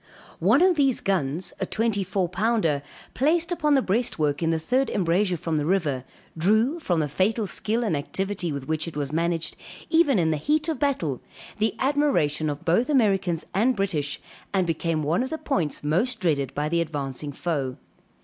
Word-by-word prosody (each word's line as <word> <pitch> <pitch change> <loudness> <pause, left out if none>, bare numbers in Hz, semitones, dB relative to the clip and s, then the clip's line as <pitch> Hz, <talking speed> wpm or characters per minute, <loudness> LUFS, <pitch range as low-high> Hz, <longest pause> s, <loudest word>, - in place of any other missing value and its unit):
One 225 - +4
of 365 -3 +4
these 275 -4 +3
guns, 175 -3 -1
a 190 - 0
twenty 215 -3 0
four 185 0 -1
pounder, 185 -5 +1 0.3
placed 325 +5 +2
upon 300 -4 +2
the 265 - +3
breastwork 175 -9 0
in 165 - +1
the 165 - +2
third 250 +11 0
embrasure 180 0 +1
from 160 0 -2
the 150 - 0
river, 150 -9 0 0.3
drew, 220 - +2
from 175 - 0
the 150 - 0
fatal 205 - 0
skill 220 +5 -1
and 205 -8 0
activity 180 +4 -2
with 140 -2 -5
which 160 +1 -1
it 160 - -7
was 145 -1 -2
managed, 165 0 -1 0.4
even 320 -7 +4
in 160 -3 +2
the 155 - 0
heat 300 - +1
of 320 - -2
battle, 175 - 0 0.4
the 220 -1 +1
admiration 265 - +1
of 145 +4 -5
both 205 - +2
Americans 195 - +2
and 240 +7 +2
British; 165 -8 -2 0.4
and 190 -2 +3
became 165 -1 -1
one 160 +9 +1
of 260 - -2
the 320 - -3
points 175 - -1
most 220 +12 +1
dreaded 145 - 0
by 150 +1 0
the 170 +2 +1
advancing 145 -3 -4
foe. 140 -4 -2
180 Hz, 185 wpm, -25 LUFS, 155-235 Hz, 0.4 s, One